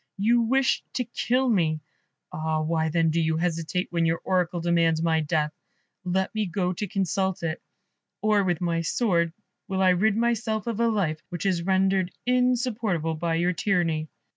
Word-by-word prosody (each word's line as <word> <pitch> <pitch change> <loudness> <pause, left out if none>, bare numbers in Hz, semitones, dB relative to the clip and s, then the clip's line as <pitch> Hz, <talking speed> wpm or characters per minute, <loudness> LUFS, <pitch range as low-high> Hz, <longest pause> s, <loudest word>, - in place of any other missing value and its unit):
You 230 +4 +3
wish 265 +3 +2
to 250 - +1
kill 250 +2 0
me. 165 -9 +2 0.5
Ah, 155 0 -1
why, 160 0 0
then, 165 0 +2
do 165 +1 +1
you 160 0 +1
hesitate, 170 +2 -1
when 170 -1 +1
your 165 0 +1
Oracle 180 -2 0
demands 165 -1 +2
my 165 -1 +2
death? 150 -1 0 0.5
Let 190 +1 -1
me 215 -2 -1
go 180 0 -1
to 205 +4 -4
consult 190 -1 -1
it, 165 0 -2 0.6
or 210 -1 +2
with 175 -3 -1
my 170 -1 0
sword 170 -2 +1 0.4
will 190 -1 0
I 185 - +5
rid 200 +4 +2
myself 225 -2 0
of 230 -2 -3
a 235 - +3
life 180 -9 0
which 175 0 -5
is 185 -3 +1
rendered 190 0 +2 0.2
insupportable 240 -9 +1
by 165 +1 -1
your 175 +2 +1
tyranny." 165 -5 0
180 Hz, 170 wpm, -26 LUFS, 165-210 Hz, 0.6 s, I